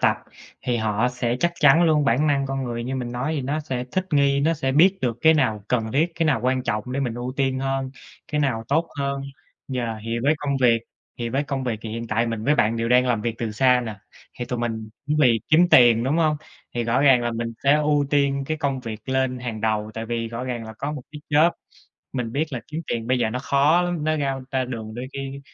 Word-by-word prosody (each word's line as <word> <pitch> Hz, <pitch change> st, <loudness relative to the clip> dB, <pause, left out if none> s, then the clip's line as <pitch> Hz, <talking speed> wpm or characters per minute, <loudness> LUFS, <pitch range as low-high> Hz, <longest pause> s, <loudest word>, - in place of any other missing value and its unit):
tập, -, -, +3 dB, 0.5 s
thì 125 Hz, -1 st, 0 dB
họ 110 Hz, +1 st, +1 dB
sẽ 125 Hz, -1 st, -2 dB
chắc 170 Hz, 0 st, +2 dB
chắn 150 Hz, +2 st, +6 dB
luôn, 155 Hz, -3 st, +3 dB
bản 135 Hz, +3 st, +2 dB
năng 140 Hz, -2 st, +1 dB
con 135 Hz, 0 st, -3 dB
người 120 Hz, -1 st, -4 dB
như 130 Hz, +2 st, -3 dB
mình 120 Hz, -2 st, -4 dB
nói 130 Hz, +6 st, -2 dB
thì 140 Hz, -, -2 dB
nó 145 Hz, +4 st, -2 dB
sẽ 130 Hz, -5 st, -4 dB
thích 185 Hz, -, 0 dB
nghi, 140 Hz, -1 st, +3 dB
nó 160 Hz, +3 st, +2 dB
sẽ 135 Hz, -4 st, -1 dB
biết 185 Hz, +7 st, +5 dB
được 120 Hz, -2 st, -1 dB
cái 160 Hz, 0 st, +6 dB
nào 110 Hz, -8 st, +1 dB
cần 110 Hz, -3 st, 0 dB
thiết, 160 Hz, +5 st, +1 dB
cái 165 Hz, 0 st, 0 dB
nào 135 Hz, -7 st, +2 dB
quan 130 Hz, 0 st, +1 dB
trọng 115 Hz, 0 st, -2 dB
để 140 Hz, -, -1 dB
mình 125 Hz, -4 st, -2 dB
ưu 120 Hz, +1 st, -4 dB
tiên 135 Hz, -1 st, +1 dB
hơn, 135 Hz, 0 st, -2 dB, 0.4 s
cái 150 Hz, -, +1 dB
nào 120 Hz, -6 st, 0 dB
tốt 160 Hz, +4 st, +1 dB
hơn. 140 Hz, 0 st, -2 dB, 0.5 s
Yeah. 120 Hz, -3 st, -2 dB
Thì 115 Hz, +1 st, -2 dB
với 145 Hz, +4 st, +3 dB
công 140 Hz, -1 st, -1 dB
việc 115 Hz, -2 st, +4 dB, 0.4 s
thì 120 Hz, -1 st, -2 dB
với 135 Hz, +4 st, 0 dB
công 135 Hz, -2 st, -3 dB
việc 115 Hz, -4 st, -2 dB
thì 110 Hz, -, -5 dB
hiện 115 Hz, +1 st, -5 dB
tại 115 Hz, +1 st, 0 dB
mình 115 Hz, -2 st, -3 dB
với 145 Hz, -, +4 dB
bạn 115 Hz, -4 st, +2 dB
đều 115 Hz, 0 st, -1 dB
đang 125 Hz, +1 st, +4 dB
làm 120 Hz, -3 st, +1 dB
việc 115 Hz, 0 st, -1 dB
từ 115 Hz, -2 st, -2 dB
xa 125 Hz, +2 st, +4 dB
nè, 110 Hz, -, -4 dB, 0.4 s
thì 120 Hz, -, -2 dB
tụi 125 Hz, 0 st, -4 dB
mình 110 Hz, -2 st, -3 dB, 0.2 s
cũng 150 Hz, +1 st, 0 dB
vì 120 Hz, -5 st, +4 dB
kiếm 170 Hz, +3 st, +5 dB
tiền, 120 Hz, -6 st, +6 dB
đúng 140 Hz, +5 st, +1 dB
hông? 155 Hz, -2 st, +2 dB, 0.4 s
Thì 120 Hz, -, 0 dB
rõ 115 Hz, +3 st, +1 dB
ràng 135 Hz, -4 st, +5 dB
là 120 Hz, -, 0 dB
mình 115 Hz, 0 st, -3 dB
sẽ 140 Hz, -, +6 dB
ưu 150 Hz, -1 st, +2 dB
tiên 140 Hz, -1 st, +2 dB
cái 155 Hz, -, -1 dB
công 140 Hz, -3 st, -1 dB
việc 115 Hz, -1 st, -8 dB
lên 130 Hz, -1 st, 0 dB
hàng 120 Hz, -3 st, -5 dB
đầu 110 Hz, -1 st, 0 dB
tại 115 Hz, 0 st, -5 dB
vì 115 Hz, 0 st, -2 dB
rõ 115 Hz, +2 st, -5 dB
ràng 120 Hz, -3 st, -4 dB
là 110 Hz, -, -8 dB
có 145 Hz, +2 st, -3 dB
một 145 Hz, -4 st, -6 dB
cái 150 Hz, -, -8 dB
job. 155 Hz, +3 st, +5 dB, 0.6 s
Mình 125 Hz, -4 st, -3 dB
biết 145 Hz, +4 st, +1 dB
là 125 Hz, -, -3 dB
kiếm 155 Hz, +2 st, -3 dB
tiền 115 Hz, -1 st, -3 dB
bây 130 Hz, +1 st, +2 dB
giờ 115 Hz, -2 st, +1 dB
nó 125 Hz, -, -2 dB
khó 140 Hz, +6 st, +3 dB
lắm, 175 Hz, -3 st, -2 dB
nó 155 Hz, 0 st, +1 dB
ra 135 Hz, -2 st, -1 dB
ra 130 Hz, -2 st, 0 dB
đường 110 Hz, -3 st, -6 dB
đôi 125 Hz, +2 st, -5 dB
khi 135 Hz, 0 st, -6 dB
130 Hz, 260 wpm, -23 LUFS, 115-145 Hz, 0.6 s, chắn